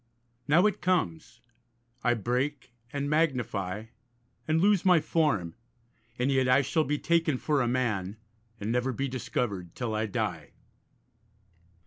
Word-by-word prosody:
Now 165 +6 +5
it 210 -1 +1
comes; 175 - -1 0.6
I 120 -1 +3
break, 125 +4 -2 0.2
and 140 0 -2
magnify, 120 - 0 0.6
and 155 +1 +2
lose 200 0 +3
my 180 -3 +6
form, 140 - 0 0.6
And 125 +3 +1
yet 130 -1 +2
I 130 +2 +5
shall 155 +4 +1
be 150 - 0
taken 165 -3 +1
for 145 +1 +1
a 120 - +1
man, 110 -6 -1 0.4
And 105 +2 -2
never 125 +2 0
be 135 +4 -2
discovered 110 -8 -3
till 120 -3 -3
I 110 +1 -1
die. 100 -8 -3
130 Hz, 135 wpm, -28 LUFS, 110-150 Hz, 0.6 s, my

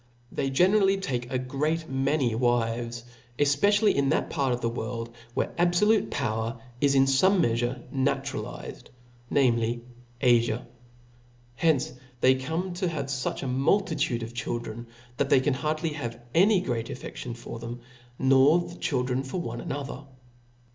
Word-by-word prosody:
They 135 - -1
generally 195 +7 +4
take 125 -11 -3
a 130 - +1
great 150 +6 -1
many 135 -2 +1
wives, 120 0 0 0.3
efpecially 200 +10 +3
in 140 -1 +1
that - - 0
part 140 -4 0
of 120 - 0
the 115 - -1
world 115 0 -5 0.2
where - - -1
abfolute 180 +5 +3
power 115 -1 -2 0.2
is 140 -1 +3
in 135 - +6
fome 185 +9 +4
meafure 120 -2 0
na 135 0 +2
turalized, 135 0 -7 0.4
namely, 120 -3 +2 0.4
Afia. 120 -2 +3 0.9
Hence 140 +2 +1 0.3
they 130 +2 +6
come 160 +8 -3
to 180 +1 -1
have 140 -5 -4
fuch 135 0 -2
a - - -2
multitude 140 - +1
of 115 +1 -7
children, 120 -1 -4 0.3
that 140 - 0
they 135 - +6
can 140 +2 +1
hardly 155 +4 -1
have 120 -6 -5
any 190 +2 +5
great 115 -8 -2
affeftion 120 -1 -7
for 115 0 -8
them, 120 +1 -7 0.4
nor 135 +4 +5
the 175 0 -7
children 125 -2 0
for 135 +7 -4
one 175 - -4
another. 140 -3 -5
135 Hz, 145 wpm, -27 LUFS, 120-155 Hz, 0.9 s, in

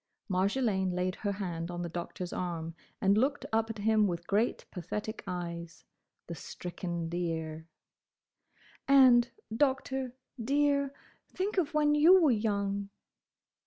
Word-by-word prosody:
Marjolaine 190 -1 +1
laid 180 0 0
her 205 -1 -2
hand 175 -4 -4
on 175 0 -4
the - - -3
Doctor's 175 +1 -5
arm 165 -2 -3 0.3
and 195 +1 +4
looked 275 +4 0
up 225 0 +2
at 225 - -5
him 215 0 +3
with 170 -2 -3
great 210 +5 0
pathetic 210 +4 -5
eyes—the 170 -1 -8
stricken 170 +1 -5
deer. 160 -2 -3 1.2
"And, 255 -3 +7 0.3
Doctor, 265 -1 0 0.3
dear—think 285 - -1
of 320 -2 -1
when 295 -1 +4
you 330 +6 +7
were 315 -6 +4
young!" 200 -2 -1
200 Hz, 120 wpm, -31 LUFS, 175-260 Hz, 1.2 s, And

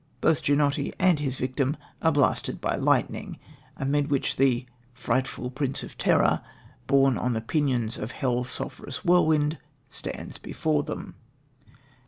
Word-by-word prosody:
Both 155 - +2
Ginotti 145 0 +1
and 180 -4 +3
his 135 -3 -2
victim 130 +3 -1 0.2
are 160 - +4
blasted 145 -3 +1
by - - -1
lightning, - - 0 0.4
amid 140 +2 0
which 140 -2 0
the 130 -2 +2 0.3
"frightful 125 +1 -1
prince 135 0 0
of - - -9
terror, - - +3 0.5
borne 135 -2 +4
on 125 0 0
the 110 - 0
pinions 125 -3 +1
of 105 +3 -5
hell's 125 -1 -1
sulphurous 140 +5 -5
whirlwind," 155 -4 +3 0.3
stands 140 - -5
before 155 -2 0
them. 150 +1 -6
140 Hz, 135 wpm, -26 LUFS, 130-150 Hz, 0.5 s, are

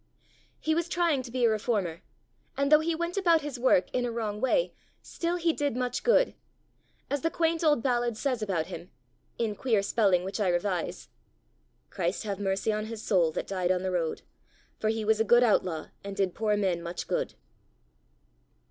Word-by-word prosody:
He 315 - 0
was 340 +1 -1
trying 340 -6 +1
to 255 - -9
be 245 0 +1
a - - +5
reformer; 205 -6 -1 0.6
and 280 +1 +1
though 305 - +8
he 325 +1 0
went 340 +3 -3
about 340 -4 +4
his 285 -4 -5
work 240 -7 +4
in 250 - +1
a 240 - -1
wrong 215 -2 -3
way, - - +2 0.3
still 340 +1 -2
he 340 -2 +1
did 285 -5 -1
much 250 0 -1
good. - - +4 0.8
As 285 -1 0
the 330 - +1
quaint 330 0 0
old 295 -7 +3
ballad 240 -3 0
says 255 -2 -1
about 185 -7 -1
him 170 +2 -8 0.5
in 225 -3 0
queer 215 -2 +1
spelling 200 -4 +2
which 195 +4 -4
I 205 - +1
revise, 175 0 -2 0.8
"Christ 175 +6 -2
have 200 -2 -3
mercy 195 +2 0
on 215 0 -2
his 225 -1 -7
soul 175 -5 +3
That - - -3
died 185 -2 -1
on 185 0 0
the 190 - -1
rood! 170 -3 -2 0.6
For 215 - 0
he 220 -1 -1
was 220 0 +3
a - - +4
good 240 +3 +5
outlaw 180 -8 +1
And 200 0 -6
did 195 -3 0
poor 210 -1 0
men 185 -4 0
much 170 +1 -5
good." - - -2
220 Hz, 190 wpm, -28 LUFS, 195-280 Hz, 0.8 s, though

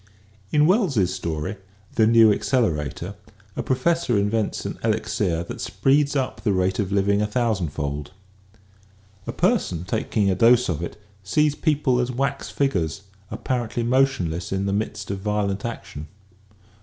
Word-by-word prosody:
In 150 0 +4
Wells's 150 - +2
story, 85 +1 -3 0.2
" 100 -1 -29
The 110 - +4
New 115 -2 +6
Accelerator," 90 - -1 0.4
a - - -2
profes 165 +6 +1
sor 120 - +2
invents 105 +1 -1
an - - -5
elixir 85 -1 0
that - - -7
speeds 140 +1 +1
up 130 -2 -2
the 105 - +1
rate 95 0 0
of 100 -2 -1
living 100 +1 +2
a 105 - +1
thousandfold. 80 - -2 1.2
A - - -1
person 85 -1 0
taking 105 +1 -1
a - - +2
dose 115 +5 +4
of 85 -2 -2
it 85 - -6 0.2
sees 150 +10 +2
people 145 -5 +1
as 125 0 0
wax 140 +2 -2
figures 100 - -1 0.3
apparently 120 -2 -2
motionless 115 -10 +1
in 95 0 -1
the 100 - 0
midst 105 0 -3
of 100 - -3
violent 105 0 -1
action. 75 -9 -6
105 Hz, 150 wpm, -23 LUFS, 95-125 Hz, 1.2 s, New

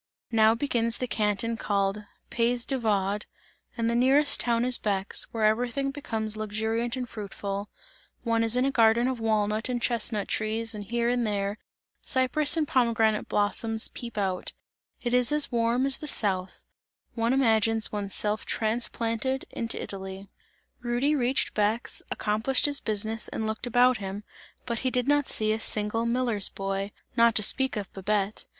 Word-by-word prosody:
Now 220 -1 +5
begins 230 -3 0
the 255 - -2
Canton 220 0 0
called 200 0 -1 0.3
Pays 240 +1 +1
de 270 -2 -1
Vaud 205 -2 0 0.5
and 230 -1 0
the 230 - +1
nearest 270 +5 +3
town 235 0 +1
is 250 -1 +2
Bex, 200 -2 -1
where 225 -2 0
everything 245 +5 +1
becomes 220 -6 -3
luxuriant 220 +2 -2
and 250 -1 -3
fruitful 200 -2 -5 0.5
one 230 -1 +1
is 225 +1 +4
in 250 - +3
a 275 - +1
garden 230 0 +4
of 260 -2 -2
walnut 215 +1 0
and 245 -1 -1
chestnut 230 -3 -1
trees 225 +1 -1
and 205 -1 -6
here 235 +2 -1
and 240 -1 +1
there, 200 0 -2 0.4
cypress 280 +4 +2
and 310 -2 +1
pomegranate 225 -4 +2
blossoms 220 +2 +2
peep 235 -2 -8
out 190 -3 -2 0.5
it 240 -1 -1
is 250 +2 +3
as 300 -1 +2
warm 235 +2 +1
as 275 -1 +2
the 305 - -7
South; 190 -8 +1 0.5
one 230 0 0
imagines 225 -4 +2
one's 200 -2 -3
self 210 +1 +1
transplanted 230 +3 -1
into 230 -1 -2
Italy. 190 0 -6 0.5
Rudy 245 +4 +1
reached 260 -2 +1
Bex, 215 +3 0
accomplished 220 +5 +1
his 285 -1 +3
business 220 +1 -1
and 220 - -4
looked 220 +3 -3
about 245 +1 +4
him, 195 +1 -6 0.4
but 235 -2 -2
he 260 - 0
did 250 0 0
not 290 -1 +3
see 215 0 0
a 220 - -2
single 220 +1 -1
miller's 235 -4 0
boy, 195 +1 -3 0.2
not 230 -1 +4
to 215 - +4
speak 265 +3 +2
of 200 -2 -6
Babette. 200 +1 -1
225 Hz, 165 wpm, -27 LUFS, 210-245 Hz, 0.5 s, Now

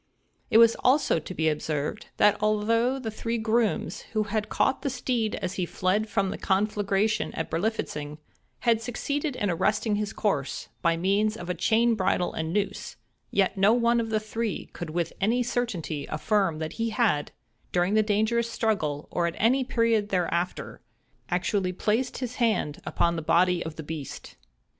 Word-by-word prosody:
It - - +5
was 230 0 +7
also 260 - +3
to 160 - -8
be 160 0 +1
observed, 150 +4 -2
that 205 0 +5
although 225 +4 +2
the 235 -4 -4
three 230 +2 -2
grooms, 225 0 0
who 215 -1 +2
had 210 0 -2
caught 265 - +1
the 280 - -1
steed 245 -4 -1
as 180 - -3
he - - +1
fled 200 +6 0
from 195 -1 0
the - - -6
conflagration 205 +2 +1
at 160 - -4
Berlifitzing, 160 -6 -2 0.4
had 230 -2 +3
succeeded 280 +5 -2
in 205 -5 0
arresting 210 +4 +1
his 210 -1 -2
course, 145 -10 -2
by 170 0 +2
means 205 +5 +1
of 175 -2 -4
a - - 0
chain 230 +5 +3
bridle 185 -3 0
and 160 0 -3
noose—yet 200 0 -2
no 200 +3 +5
one 235 0 +3
of 225 -1 -2
the 220 -1 +1
three 215 0 -4
could 170 - -6
with 170 +1 -2
any 235 +5 +2
certainty 200 -12 -2
affirm 190 +1 0
that 160 0 -4
he 230 0 -1
had, 210 -10 +1 0.4
during 180 +2 +1
that 215 0 +3
dangerous 225 +3 +1
struggle, 180 -11 -1
or 170 -1 +1
at 170 - -4
any 255 +5 +3
period 230 -4 +1
thereafter, 180 -1 -2 0.5
actually 185 +1 0
placed 225 +7 0
his 250 -1 -5
hand 220 - 0
upon 170 0 +1
the - - -2
body 175 +2 +3
of 160 -1 -6
the 160 - -7
beast. 150 -3 -7
210 Hz, 170 wpm, -27 LUFS, 175-230 Hz, 0.5 s, was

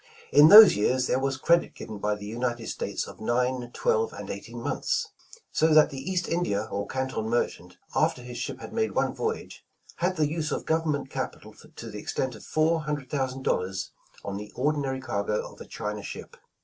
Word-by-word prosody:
' 460 - -21
' - - -22
In 150 - +10
those 215 +2 +11
years 125 +5 +2
there 125 - +1
was 135 0 -1
credit 170 +5 +2
given 110 -2 -8
by 105 +1 0
the 105 0 -9
United 120 +1 -3
States - - -3
of - - -11
nine, 125 +2 0
twelve 465 - +1
and - - -6
eighteen - - -7
months! 480 -4 -1 0.4
So 160 0 +3
that 155 0 +6
the 135 - -6
East 175 +5 -2
India 110 -12 0
or 100 0 -3
Canton 130 -4 -2
merchant, 90 -6 -2 0.2
after 125 - +1
his 125 0 -7
ship - - -5
had - - -8
made 445 - 0
one - - +1
voyage, 450 0 -4 0.3
had 180 +2 0
the 155 -3 +2
use 160 +1 -2
of - - -3
government 155 -4 0
capital - - -5
to 115 -1 -11
the 105 - -6
extent 130 +4 -2
of - - -12
four 160 +1 +1
hundred 150 -3 -4
thousand 130 -2 -2
dollars, 95 -3 -1 0.3
on 100 0 -3
the 105 0 -8
ordinary 135 -1 0
cargo 105 -4 -2
of - - -15
a - - -8
China 105 0 -4
ship. - - -8
130 Hz, 200 wpm, -27 LUFS, 110-160 Hz, 0.4 s, those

